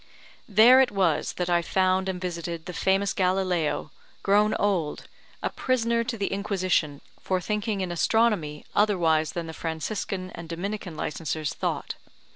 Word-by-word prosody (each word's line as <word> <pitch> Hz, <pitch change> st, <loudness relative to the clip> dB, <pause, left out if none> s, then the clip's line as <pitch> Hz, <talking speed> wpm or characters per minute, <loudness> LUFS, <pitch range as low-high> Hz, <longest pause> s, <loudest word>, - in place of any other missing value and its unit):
There 230 Hz, +6 st, +7 dB
it 265 Hz, -, +3 dB
was 185 Hz, -6 st, +1 dB
that 180 Hz, -, -2 dB
I 175 Hz, -1 st, +3 dB
found 185 Hz, +2 st, +1 dB
and 185 Hz, -1 st, -3 dB
visited 170 Hz, -2 st, -4 dB
the 180 Hz, -, -6 dB
famous 195 Hz, +3 st, +1 dB
Galileo, 185 Hz, -4 st, 0 dB, 0.3 s
grown 210 Hz, +2 st, +3 dB
old, 185 Hz, -7 st, -1 dB, 0.4 s
a -, -, -1 dB
prisoner 235 Hz, -2 st, +1 dB
to 230 Hz, -1 st, -3 dB
the 200 Hz, -, -2 dB
Inquisition, 185 Hz, -7 st, 0 dB, 0.2 s
for 185 Hz, -1 st, -1 dB
thinking 210 Hz, +1 st, -2 dB
in 185 Hz, -2 st, -2 dB
astronomy 175 Hz, -5 st, +1 dB
otherwise 165 Hz, -7 st, +2 dB
than 170 Hz, -1 st, -3 dB
the 160 Hz, -, -7 dB
Franciscan 185 Hz, +3 st, -4 dB
and 165 Hz, -1 st, -9 dB
Dominican 180 Hz, 0 st, -4 dB
licensers 155 Hz, -1 st, -3 dB
thought. -, -, -3 dB
185 Hz, 145 wpm, -26 LUFS, 170-205 Hz, 0.4 s, There